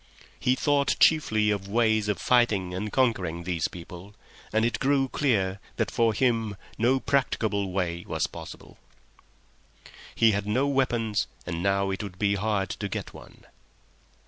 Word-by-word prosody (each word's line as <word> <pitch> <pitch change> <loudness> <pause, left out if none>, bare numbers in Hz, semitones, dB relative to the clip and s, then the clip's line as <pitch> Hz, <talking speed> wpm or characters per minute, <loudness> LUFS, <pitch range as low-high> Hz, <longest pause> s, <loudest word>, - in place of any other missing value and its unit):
He 125 - +2
thought 140 0 +2
chiefly 110 -9 +4
of 100 -1 -3
ways 110 0 +2
of 105 - 0
fighting 105 -6 +2
and 105 +3 -4
conquering 95 -10 0
these 85 -2 -1
people, 90 +3 -11 0.4
and 110 +1 +2
it 120 - -1
grew 135 -1 +2
clear 100 -9 0 0.2
that 110 -4 -1
for 115 -1 +2
him 115 -5 +1 0.2
no 125 +4 +3
practicable 110 -8 0
way 85 -2 -2
was - - -1
possible. - - -10 1.4
He 115 -1 +5
had 100 0 -2
no 125 +6 +1
weapons, 120 -6 0 0.2
and 85 -1 -4
now 100 0 +1
it 95 - -3
would 100 -3 -7
be 100 0 +1
hard 100 -1 -1
to 100 - -4
get - - -5
one. - - -14
105 Hz, 150 wpm, -26 LUFS, 95-120 Hz, 1.4 s, He